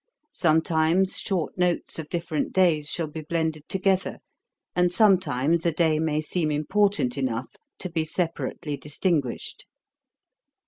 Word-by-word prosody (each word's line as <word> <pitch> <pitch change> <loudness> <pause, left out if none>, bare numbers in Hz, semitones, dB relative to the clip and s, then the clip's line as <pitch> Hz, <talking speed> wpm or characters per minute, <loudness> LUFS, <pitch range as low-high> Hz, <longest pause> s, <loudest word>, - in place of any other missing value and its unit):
Sometimes 160 +3 +2
short 185 -5 -2
notes 175 -2 0
of 155 -2 -7
different 165 -3 -2
days 165 -6 +3
shall 170 - -1
be 155 +1 -7
blended 160 -1 -2
together, 190 0 0 0.6
and 180 -1 +3
sometimes 170 - +3
a 170 - +2
day 160 -1 +2
may 155 -1 0
seem 155 +1 0
important 150 -3 +1
enough 125 -1 -3 0.2
to - - -5
be 165 -2 -1
separately 160 -2 -2
distinguished. 150 -1 -2
160 Hz, 125 wpm, -25 LUFS, 150-180 Hz, 0.6 s, days